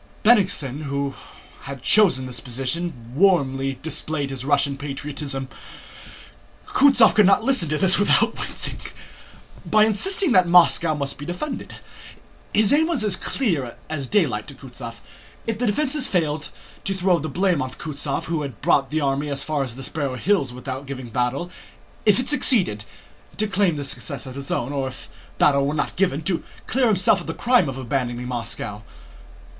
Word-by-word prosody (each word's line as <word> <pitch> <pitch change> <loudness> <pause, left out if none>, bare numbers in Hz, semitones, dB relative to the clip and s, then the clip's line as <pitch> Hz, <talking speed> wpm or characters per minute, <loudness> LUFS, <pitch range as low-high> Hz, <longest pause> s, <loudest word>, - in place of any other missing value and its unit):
Bennigsen, 180 - +2
who 140 0 -2 0.5
had 135 -2 -8
chosen 175 -12 +5
the 125 - -8
position, 125 +2 -3
warmly 135 -6 +2
displayed 155 -3 -2
his 130 -2 -5
Russian 140 0 +1
patriotism 140 -1 -4 1.2
(Kutúzov 260 -5 +5
could 210 -3 +5
not 195 - +4
listen 250 - +1
to 155 - 0
this 190 +3 +3
without 205 - +3
wincing) - - -4 0.8
by 215 0 +4
insisting 360 - +2
that 185 -5 +5
Moscow 170 -2 +5
must 140 -1 -4
be 145 - -7
defended. 260 +12 -5 0.8
His 215 +2 +4
aim 315 +2 +4
was 325 -10 -1
as 210 -3 +2
clear 160 - -2 0.2
as 140 -4 -3
daylight 140 - +1
to 140 - -10
Kutúzov: 125 -3 -9 0.5
if 225 -1 -3
the 245 - 0
defense 275 +5 0
failed, 155 -4 -1 0.3
to 195 - -2
throw 185 -2 +2
the 155 +1 -4
blame 180 0 +1
on 130 - -3
Kutúzov 140 +1 -4
who 165 -2 -2
had 135 -7 -6
brought 135 -1 +2
the 155 +1 -1
army 140 +1 0
as 140 -1 -2
far 155 -2 -1
as 125 -3 -7
the 135 - -8
Sparrow 140 -2 -3
Hills 155 -2 +1
without 130 +2 -7
giving 130 -3 -7
battle; 125 +9 -2 0.6
if 210 +2 +5
it 255 - -2
succeeded, 190 - +2 0.5
to 215 - +1
claim 200 -5 +1
the 145 - -4
success 140 +1 -4
as 130 - -8
his 140 +1 -7
own; 125 +4 -2
or 135 -2 -1
if 130 - -10 0.3
battle 140 -1 +3
were 145 - -1
not 150 - -2
given, 170 -5 0
to 175 0 -1 0.2
clear 255 0 +2
himself 195 -2 +3
of - - -11
the 165 - -4
crime 240 - +3
of 130 - -6
abandoning 125 -1 -2
Moscow. 115 -4 -4
150 Hz, 170 wpm, -22 LUFS, 135-195 Hz, 1.2 s, chosen